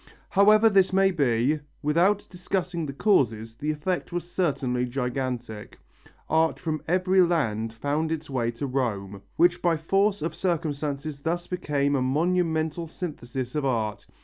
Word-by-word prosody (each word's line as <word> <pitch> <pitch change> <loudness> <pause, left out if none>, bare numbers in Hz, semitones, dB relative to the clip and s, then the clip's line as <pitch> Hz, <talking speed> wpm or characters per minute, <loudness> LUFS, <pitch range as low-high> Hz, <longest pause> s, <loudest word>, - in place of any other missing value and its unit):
However 210 +3 +6
this 195 -3 +4
may 195 0 +4
be, 140 -2 +1 0.2
without 175 +7 +2
discussing 180 -2 -3
the - - -4
causes, 115 - +1
the 145 +7 -4
effect 160 +5 -2
was 175 0 -3
certainly 135 -9 0
gigantic: 125 -3 -4 0.5
art 160 +1 +2
from 155 -2 -3
every 185 +2 +3
land 115 -11 +1
found 145 +7 -2
its 160 -2 -3
way 125 -4 -1
to 120 +4 -4
Rome, 105 -7 -2
which 175 +1 +3
by 170 -2 +2
force 195 +4 +1
of 165 - -2
circumstances 150 -4 -2
thus 175 +2 -2
became 145 -5 0
a 135 - +1
monumental 160 +3 0
synthesis 130 -7 -5
of 150 - -1
art. 115 -6 -1
155 Hz, 145 wpm, -26 LUFS, 130-175 Hz, 0.5 s, However